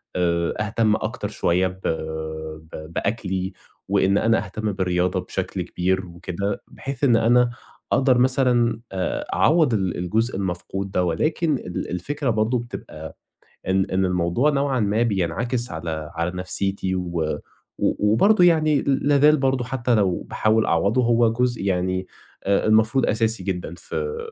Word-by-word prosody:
آآ 85 -1 +1
أهتم 110 0 +1
أكتر 110 -1 -3
شوية 95 -2 +1
ب- 95 0 -9 0.9
ب 80 +2 -9
بأكلي 95 -3 -2 0.3
وإن 100 0 +2
أنا 115 -2 +2
أهتم 105 +2 -3
بالرياضة 90 -1 0
بشكل - - -4
كبير 95 +1 -1
وكده، 90 +3 -4
بحيث 135 0 -7
إن 120 -4 +5
أنا 120 +2 +4 0.4
أقدر 130 -1 +4
مثلًا 125 -3 +2
آآ 95 -1 -2
أعوّض 155 -7 +3
ال 95 -4 0
الجزء 110 +7 0
المفقود 95 +1 -4
ده 90 - +1
ولكن 155 - 0
ال 90 - -5
الفكرة 135 - -2
برضه 110 +3 +1
بتبقى 80 -9 -9 0.5
إن 95 0 +3
إن 95 0 +1
الموضوع 90 - +1
نوعًا 140 -3 0
ما 105 +3 +1
بينعكس 115 +4 -1
على 80 -1 -5
على 85 +1 -1
نَفْسيتي 95 +1 -1
و 85 -2 -2 0.6
و 105 0 +1
وبرضه 195 - +5
يعني 155 -4 +4
ل 140 +1 0
لا 145 -1 +4
زال 150 +2 +6
برضه 135 -2 0
حتّى 125 -1 0
لو 100 -5 +1
باحاول 110 +1 +1
أعوّضه 100 +9 +2
هو 115 -1 +3
جزء 125 -2 0
يعني 95 -1 -1 0.4
آآ 100 0 +2
المفروض 110 +4 +3
أساسي 110 -2 0
جدًا 90 -3 -3
في 455 - -4
105 Hz, 145 wpm, -23 LUFS, 90-125 Hz, 0.9 s, زال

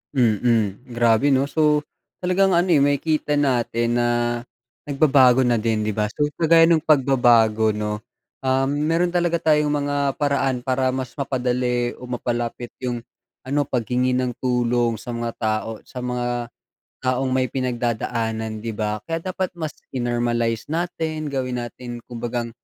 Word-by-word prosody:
Mm. 115 -2 +1
Grabe 120 +3 +3
'no 135 +1 +3
so 150 0 +3 0.4
talagang 185 +2 +2
ano 175 +1 +3
eh 155 -6 +4
makikita 145 +1 +1
natin 120 -3 +1
na 120 0 +2 0.8
nagbabago 135 -3 +4
na 125 -2 +3
din 110 -1 0
'di 105 - -2
ba 105 -1 -1
so 145 +5 0
kagaya 165 0 +5
ng 165 -3 +3
pagbabago 120 -6 +4
'no, 105 0 -3 0.4
um, 130 0 +2
meron 155 +5 +1
talaga 175 -1 +1
tayong 150 -2 +2
mga 145 -1 -1
paraan 140 -3 +1
para 130 +1 0
mas 130 -1 -5
mapadali 125 -3 -1
o - - -14
mapalapit 120 0 -3
yung 120 -1 -2 0.5
ano 145 +2 +1
paghingi 125 0 0
ng 125 -1 0
tulong 120 -2 0
sa 120 +1 -6
mga 115 0 -3
tao 110 0 -1 0.2
sa 125 -1 -7
mga 120 -1 -2 0.5
taong 130 +1 +1
may 130 0 +1
pinagdadaanan 115 -3 -2
'di 115 - -3
ba? 105 0 -2
Kaya 165 0 -3
dapat 185 0 -3
mas 160 -4 -6 0.2
in-normalize 120 -2 -1
natin 160 -2 -3
gawin 130 -3 -2
natin 120 0 -7
kumbagang 120 0 -3
125 Hz, 145 wpm, -22 LUFS, 120-145 Hz, 0.8 s, kagaya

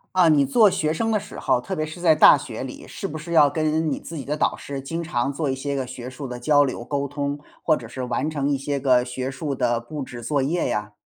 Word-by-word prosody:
啊， 180 -3 +6
你 145 -3 +5
做 220 - +5
学 155 0 0
生 225 +7 -1
的 215 - +2
时 210 - -10
候， - - +2
特 125 - -5
别 155 - -1
是 155 +3 -9
在 165 -3 +5
大 - - +8
学 - - -6
里， - - -8
是 - - -7
不 155 - -4
是 170 +2 -6
要 150 -3 +6
跟 155 +1 0
你 - - -2
自 165 - -9
己 145 - -5
的 150 +3 -3
导 - - +1
师 140 -1 -6
经 165 +5 -4
常 140 -5 -1
做 145 0 -2
一 - - +1
些 140 +2 -3
个 135 -1 -1
学 125 0 -7
术 130 +2 -8
的 125 -1 -6
交 145 +3 +4
流 130 -3 -3
沟 140 +1 -1
通， 145 0 -3 0.3
或 155 - +4
者 125 - -8
是 125 +3 -7
完 125 +4 -1
成 145 -2 -1
一 140 - +1
些 140 +1 -2
个 125 -2 +4
学 130 +1 -4
术 140 +2 -4
的 120 -2 +1
布 145 +6 -6
置 120 -2 -7
作 145 +2 0
业 160 +6 0
呀？ 105 0 -3
140 Hz, 300 characters per minute, -23 LUFS, 130-155 Hz, 0.3 s, 大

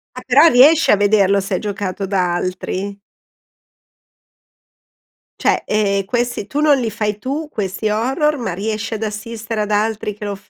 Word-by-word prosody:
Ah, - - -7
però - - +6
riesci 300 +4 +6
a - - +6
vederlo 200 -1 +3
se 195 - -3
è - - -1
giocato 200 -2 -4
da 185 -3 0
altri? 185 +2 -4 2.4
Cioè, - - +2
ehm, 200 -2 0
questi 240 -1 -2
tu 285 - -3
non 300 -2 +4
li 235 -3 -1
fai 210 -1 -2
tu 290 +6 -4
questi 210 -2 -3
horror, 270 +8 0
ma 230 -8 -3
riesci 215 +4 -3
ad 220 0 -4
assistere 220 +1 -4
ad 210 0 -3
altri 210 0 -1
che 210 +1 -8
lo 205 -1 -3
f 195 +1 -20
210 Hz, 165 wpm, -18 LUFS, 200-235 Hz, 2.4 s, però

